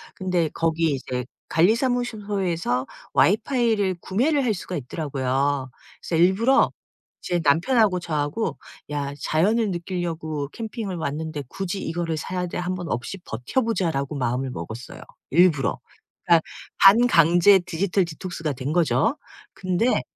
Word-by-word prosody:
근데 180 -4 0
거기 165 -1 +1
이제 125 -2 -4 0.2
관리사무소 220 +1 +1
에서 165 -8 -1 0.3
와이파이를 210 - +2
구매를 275 +9 +1
할 235 -4 +1
수가 185 -1 -6
있더라고요. 135 -1 -1 0.3
그래서 170 - -3
일부러 225 +9 +4 0.5
제 175 -1 -1
남편하고 185 - +3
저하고 155 +2 -2 0.3
'야 140 -1 -2
자연을 205 - +1
느끼려고 170 -4 -3
캠핑을 220 -4 -5
왔는데 155 -1 -4
굳이 195 0 -4
이거를 165 -1 -2
사야 180 +3 -3
돼? - - -5
한번 180 -1 -3
없이 120 +11 -3
버텨보자.'라고 160 - -1
마음을 130 0 -1
먹었어요 120 0 -8 0.3
일부러. 165 -4 +3 0.4
그러니까 170 -2 +5 0.4
반강제 195 -3 +6
디지털 180 +2 0
디톡스가 165 -2 -5
된 135 +3 -4
거죠. 170 - +2 0.4
근데 195 +4 +1
175 Hz, 310 characters per minute, -24 LUFS, 145-200 Hz, 0.5 s, 반강제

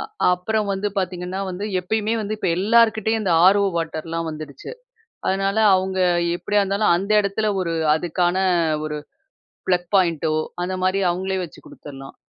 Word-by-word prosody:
அ - - -3 0.3
அப்புறம் 210 +3 -2
வந்து 195 +1 -2
பாத்தீங்கன்னா, 180 0 -3
வந்து 185 +3 -5 0.2
எப்பயுமே 215 +4 -1
வந்து 215 +1 -3
இப்ப - - -1
எல்லார்கிட்டெயும் 220 +1 +3
இந்த 190 -4 +1
ஆர் 195 +2 +6
ஓ - - +2
வாட்டர்லாம் 165 0 -3
வந்துருச்சு. 155 - -9 0.6
அதுனால 195 +2 0 0.2
அவுங்க 190 0 -2 0.4
எப்படியா 205 +2 +1
இருந்தாலும் 200 -1 +2
அந்த 195 +4 -2
இடத்துல 205 +2 -1
ஒரு 170 -2 -2 0.2
அதுக்கான 175 +2 0 0.5
ஒரு 150 -1 -4 0.7
ப்ளக் 180 -1 +1
பாயிண்டோ, 165 -4 +2 0.3
அந்த 180 +1 -2
மாரி 185 +1 +1
அவங்களே 190 +2 -2
வச்சு 160 - -10
குடுத்தர்லாம். 135 -2 -11
185 Hz, 145 wpm, -22 LUFS, 175-205 Hz, 0.7 s, ஆர்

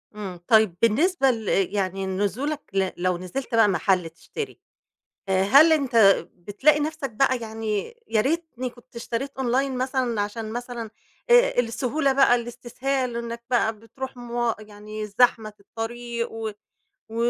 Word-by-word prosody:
إمم، 190 -4 -6
طيب 220 -6 +4
بالنسبة 270 - +3
ل 225 -3 -5 0.3
يعني 195 -1 -1
نزولك 205 +11 -2
ل 190 -1 +1
لو 180 0 0
نزلت 185 +8 -4
بقى 225 -2 +6
محل 180 -1 +1
تشتري 405 - -7 0.7
آآ، 190 0 +2
هل 280 +11 +7
أنت 275 -6 +1 0.4
بتلاقي 210 - +2
نَفْسك 305 -2 -3
بقى، 260 +3 +2
يعني 220 - -3
يا 220 - +2
ريتني 270 -2 -2
كنت 240 0 -20
اشتريت 235 +4 -4
online 265 +2 +1
مثلًا، 255 -3 -1
عشان 215 +2 -4
مثلًا 240 -2 -5 0.4
آآ 485 - +5
السهولة 265 +4 0
بقى، 270 -2 +5
الإستسهال، 245 +1 -2
إنّك 235 0 -5
بقى 225 -3 +1
بتروح 260 +4 -8
موا 240 -1 -1
يعني 215 0 -8
زحمة 220 0 +2
في 210 - -28
الطريق، 235 +2 -5
و 225 -1 -4 0.6
و 225 - -9
235 Hz, 140 wpm, -24 LUFS, 210-265 Hz, 0.7 s, هل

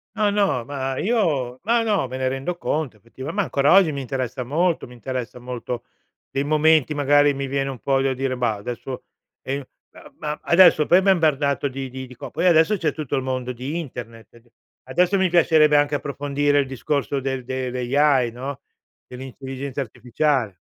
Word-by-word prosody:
No, 210 -2 +2
no, 175 - +1
ma 135 -1 -3
io 150 - 0
ma 230 +3 +2
no, 205 - +1
me 130 +1 -6
ne 130 - -1
rendo 135 +7 -3
conto, 150 -10 -2
effettiva 130 +7 -8
ma, 205 +1 0
ancora 140 +2 +2
oggi, 190 -5 +6
mi 140 -2 -4
interessa 130 -1 -3
molto 165 +5 0
mi 125 - -13
interessa 125 -1 -5
molto 125 -1 -5 0.5
dei 135 - -1
momenti, 155 0 +3
magari, 145 0 +4
mi 140 0 -3
viene 135 0 -1
un 135 - -6
po' 135 -1 +1
da 135 0 +1
dire: 130 0 -2
"Bah, 120 -3 0
adesso," 120 +5 -6 0.4
ehm, 140 +1 -3 0.3
ma - - -14
ma 150 0 -4
adesso, 170 -3 +6
poi, 180 +2 +6
m'ha 195 - +5
imbardato 145 -6 +1
di 135 0 -5
di 130 0 -7
di 125 - -13
co - - -9
poi, 185 - 0
adesso, 170 +4 +5
c'è 165 -6 0
tutto 145 -2 -4
il 135 - 0
mondo 130 -1 -3
di 130 +7 -5
internet 115 -6 -9
ed 120 0 -21 0.4
adesso 180 +8 +2
mi 190 -1 +2
piacerebbe 155 -3 +5
anche 145 0 +2
approfondire 145 +1 0
il 140 - +2
discorso 140 +2 -2
del 130 -2 -3
dell' 130 -1 -3 0.2
AI, 135 -5 +4
no, 130 +3 -6 0.5
dell'intelligenza 135 +1 -6
artificiale. 125 - -1
135 Hz, 185 wpm, -22 LUFS, 130-155 Hz, 0.5 s, oggi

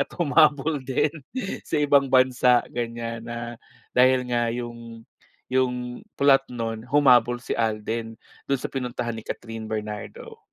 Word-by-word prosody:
at - - -29
humabol 150 -2 +3
din 135 +3 +1 0.5
sa - - -2
ibang 140 -1 +4
bansa, 125 -1 +5
ganyan 115 -1 -4
na 120 0 -6 0.4
dahil 130 +1 +5
nga 120 -1 +1
yung 115 -1 -7 0.5
yung 125 -1 -1 0.2
plot 135 -1 +4
nun 115 -2 -4
humabol 125 -4 +5
si - - -4
Alden 115 0 -2 0.3
do'n 140 -2 +1
sa - - -5
pinuntahan 125 -2 -3
ni - - -6
Kathryn 115 -1 -6
Bernardo. 105 -1 -6
120 Hz, 130 wpm, -24 LUFS, 115-130 Hz, 0.5 s, bansa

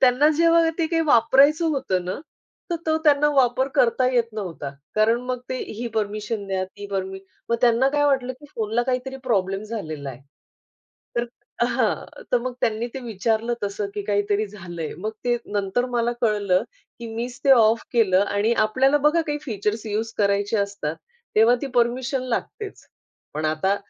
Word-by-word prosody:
त्यांना 260 +3 +5
जेव्हा 335 0 +5
ते 325 - +2
काही 330 0 +1
वापरायचं 285 +5 +5
होतं 190 - -1
ना, 185 - -4 0.5
तर 340 - +1
तो 315 0 +3
त्यांना 295 0 +5
वापर 260 0 +3
करता 250 +2 +3
येत 235 -2 +2
नव्हता. 180 -9 -5 0.2
कारण 225 +2 +3
मग 255 -1 -2
ते 255 - -2
ही 235 +3 -6
परमिशन 210 0 -2
द्या 190 -1 -1
ती 200 +2 -10
परमिशन 190 0 -4 0.3
मग 235 - +3
त्यांना 245 +2 +4
काय 290 0 +2
वाटलं 260 -3 +1
की 295 - -13
फोनला 225 +2 0
काहीतरी 255 +1 -2
प्रॉब्लेम 195 -4 0
झालेला 155 -11 -5
आहे. 125 - -11 1.0
तर 235 - +2 0.4
हां. - - -1
तर 245 - +5
मग 250 +1 -4
त्यांनी 230 0 0
ते 270 - -4
विचारलं 225 +2 0
तसं 200 0 -2
की 205 - -3
काहीतरी 205 +1 +1
झालं 180 -4 -9
आहे 155 - -4
मग 215 +4 -3
ते 240 0 +2 0.2
नंतर 205 +4 0
मला 235 0 +1
कळलं 205 -5 +2 0.4
की 235 - -7
मीच 240 +2 -4
ते 275 - +5
ऑफ 225 -2 +5
केलं 195 -6 +4
आणि 205 +3 +1
आपल्याला 270 +6 +3
बघा 335 +3 +4
काही 300 -2 -2
फीचर्स 215 -3 -2
यूज 220 +2 -2
करायचे 200 +1 +2
असतात 200 -6 -2 0.4
तेव्हा 225 +3 +6
ती - - -1
परमिशन 250 +2 +1
लागतेच. 400 - -4 0.5
पण 155 - -3
आता 155 +6 +1
230 Hz, 170 wpm, -23 LUFS, 200-255 Hz, 1.0 s, तेव्हा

